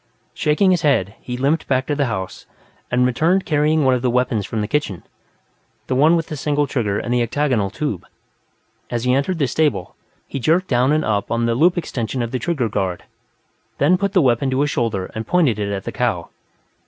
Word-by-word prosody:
Shaking 155 +6 +2
his 180 - +2
head, 100 -10 +1
he 125 0 -5
limped 140 +5 0
back 130 -1 +1
to 145 - -1
the 140 -2 0
house, 95 -5 -5 0.4
and 125 +1 +2
returned 165 +10 +2
carrying 150 0 +2
one 130 - +4
of 125 - 0
the 125 - +1
weapons 120 -4 0
from 110 - -2
the 105 - -2
kitchen 115 - -2 0.8
the - - -2
one 150 +6 +5
with 165 -2 0
the 155 - -6
single 145 0 0
trigger 110 -7 -1
and 120 - -2
the 125 - +2
octagonal 120 -4 0
tube. 110 - -4 0.8
As 120 -1 -2
he 125 0 +2
entered 140 +7 0
the 145 - +1
stable, 145 - 0 0.3
he 135 - -5
jerked 170 +8 +2
down 125 +2 +2
and 155 +1 +1
up 105 -2 -1
on 115 0 0
the 115 - +1
loop 170 +9 +3
extension 125 -6 -3
of 115 - -4
the 130 - -2
trigger 135 -3 -1
guard, 95 -4 -2 0.7
then 155 +6 +4
put 200 +1 -1
the 185 -5 +4
weapon 130 +1 +2
to 130 +1 0
his 145 0 +1
shoulder 110 -6 -2
and 110 0 -5
pointed 155 - +2
it 100 -1 -2
at 100 -1 -3
the - - -5
cow. 115 -10 -1
130 Hz, 215 wpm, -20 LUFS, 115-150 Hz, 0.8 s, one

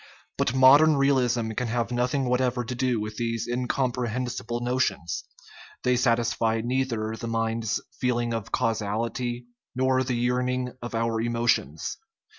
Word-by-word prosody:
But 120 - +1
modern 140 +4 +7
realism 125 -5 +2
can 125 +3 -2
have 115 +1 -1
nothing 125 +3 0
whatever 125 0 +1
to 125 - -4
do 125 -2 0
with 105 0 -5
these 115 -1 -2
incompre 125 0 -1
hensible 120 0 -3
notions; 120 -9 -1 0.6
they 125 0 +3
satisfy 115 -2 +1
neither 120 -3 -1
the 115 - -6
mind's 115 -1 -1 0.2
feel 125 -1 +1
ing 120 -1 -1
of 115 -3 -4
causality 115 +3 -1 0.3
nor 130 0 +2
the 130 -1 -1
yearning 125 +1 0
of 120 -1 -5
our 115 0 0
emotions. 115 - 0
120 Hz, 140 wpm, -26 LUFS, 115-125 Hz, 0.6 s, modern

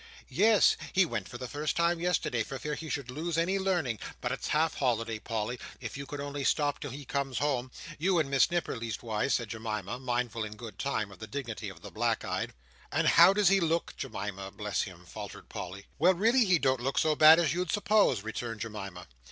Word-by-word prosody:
"Yes. 220 -1 +5 0.2
He 190 -1 +5
went 115 - -4
for 120 - -7
the 125 - -6
first 150 +3 -2
time 170 0 +2
yesterday, 165 -8 0
for 135 +4 -4
fear 150 +3 -4
he 160 +1 -6
should 140 -4 -3
lose 160 +4 -3
any 185 +4 +1
learning. 175 - 0 0.2
But - - -2
it's - - -3
half 155 +1 +2
holiday, 115 -4 0
Polly: 115 +2 -3 0.2
if 115 -3 -6
you 140 0 -6
could 145 +1 -6
only 145 0 -4
stop 145 +1 +1
till 145 - -5
he 140 +3 -8
comes 135 -1 -2
home—you 150 +6 -1
and 155 -4 +2
Miss 135 +1 +4
Nipper, 175 0 -1
leastways," 115 +1 -1
said 120 - -2
Jemima, 110 -1 -4
mindful 120 -3 -1
in 110 0 -6
good 115 0 -10
time 110 -7 -1
of 95 - -14
the 110 - -7
dignity 120 -1 -5
of - - -13
the - - -8
black - - 0
eyed. - - -3 0.4
"And - - +3
how - - +8
does 200 -2 +4
he 195 0 +5
look, 165 -1 0
Jemima, 100 -6 -5
bless 105 +2 -2
him!" 90 -2 -7
faltered - - -9
Polly. 95 +3 -7
"Well, 180 +3 +5
really 230 +6 +4
he 185 -3 +4
don't 130 -4 +1
look 135 +2 -2
so 155 -1 +3
bad 155 +2 +9
as 165 -3 +2
you'd 180 0 -1
suppose," 205 - +3
returned 110 0 -5
Jemima. 95 -5 -6
135 Hz, 210 wpm, -30 LUFS, 115-165 Hz, 0.4 s, bad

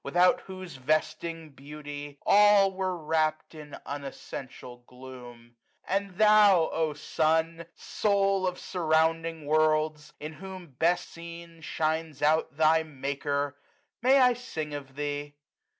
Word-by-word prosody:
Without 175 +5 +3
whose 185 -5 -9
vesting 155 +3 -2
beauty 145 +1 -9
all 205 -1 +6
were 185 -1 -2
wrapt 155 0 -1
In 150 -2 -10
unessential 135 -3 -8
gloom; 125 -2 -12 0.3
and 195 -1 -2
thou, 210 -5 +6
O 160 -2 -1
Sun! 160 +2 0
Soul 195 -2 +1
of 180 - -3
surrounding 165 -2 0
worlds! 155 0 +1
in 155 +1 -6
whom 185 0 -10
best 170 +7 +1
seen 170 0 -9
95 160 - -12
Shines 160 -2 -2
out 155 -1 +2
thy 160 +1 +4
Maker! 140 -1 -3 0.5
may 260 +3 +5
I 250 -2 +5
sing 160 -12 -6
of 135 -2 -8
thee? 145 0 -4
160 Hz, 120 wpm, -28 LUFS, 145-180 Hz, 0.5 s, all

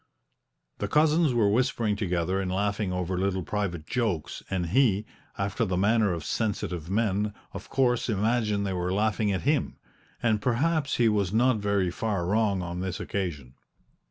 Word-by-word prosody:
The 100 - -1
cousins 155 +4 +3
were 110 -3 +4
whispering 115 -2 +1
together 90 -2 -1
and 90 -1 -2
laughing 100 +1 -1
over 90 0 -2
little 95 -1 0
private 85 -3 -3
jokes, 105 -8 -2
and 95 -2 -1
he, 110 -2 +3 0.3
after 100 +3 -1
the 95 -4 -1
manner 105 +1 +3
of 85 -3 -4
sensitive 90 -7 -2
men, 105 0 0 0.2
of - - -8
course 125 -2 +1
imagined 105 -1 +1
they 95 - -1
were 90 0 -1
laughing 105 +1 +1
at 95 - -1
him 145 +1 0 0.5
and 110 -3 +2
perhaps 140 +6 +1
he 120 - +4
was 100 -4 +1
not 120 +2 +3
very 100 -3 0
far 100 -2 -2
wrong 100 -1 +1
on 85 0 -5
this 95 -1 -3
occasion. 75 -10 -4
100 Hz, 160 wpm, -27 LUFS, 95-115 Hz, 0.5 s, were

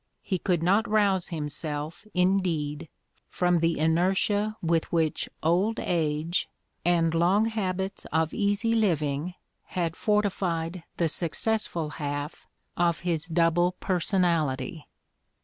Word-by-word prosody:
He 185 -3 -1
could 175 -3 0
not 200 +6 +3
rouse 200 -4 +2
himself, 150 +2 -4
indeed, 170 -5 +1 0.4
from 180 -1 +2
the 165 0 +1
inertia 190 +6 +1
with 165 -1 0
which 160 -2 0
old 185 +8 +2
age 160 0 0 0.3
and 165 -2 +3
long 180 +6 +3
habits 195 -3 -2
of 160 0 +1
easy 205 +3 +1
living 165 -6 0 0.4
had 165 -2 0
fortified 185 -5 0 0.2
the 170 - +2
successful 170 0 -1
half 145 +1 -4 0.3
of 170 -1 +1
his 170 -2 -1
double 170 +1 +2
personality. 170 - 0
175 Hz, 110 wpm, -27 LUFS, 160-190 Hz, 0.4 s, not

